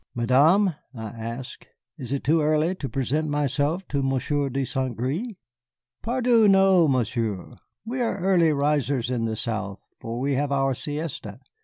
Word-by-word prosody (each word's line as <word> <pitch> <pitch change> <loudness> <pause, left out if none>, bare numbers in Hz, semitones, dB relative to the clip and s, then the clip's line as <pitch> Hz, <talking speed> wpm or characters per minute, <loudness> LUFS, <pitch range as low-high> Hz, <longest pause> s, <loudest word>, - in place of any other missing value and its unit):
"Madame," 150 - +4 0.2
I 110 -2 -6
asked, 115 +3 -7 0.3
"is 130 -6 -7
it 140 - -2
too 160 +3 +3
early 155 +3 +2
to 145 -8 -6
present 145 +4 -1
myself 145 +5 -1
to 140 -1 0
Monsieur 135 +2 0
de 135 +1 -2
Saint 130 -3 -2
Gré?" 170 - -3 0.6
"Pardieu, 240 -2 +3
no, 190 -3 +5
Monsieur, 115 -7 -1 0.3
we 250 +3 -3
are 230 -4 0
early 180 -4 +3
risers 140 -4 0
in 120 -2 -1
the 110 -1 -2
South 105 -4 -4
for 115 +1 -5
we 140 +2 0
have 140 +1 -1
our 135 -1 +1
siesta. 145 -6 -5
140 Hz, 155 wpm, -24 LUFS, 125-165 Hz, 0.6 s, no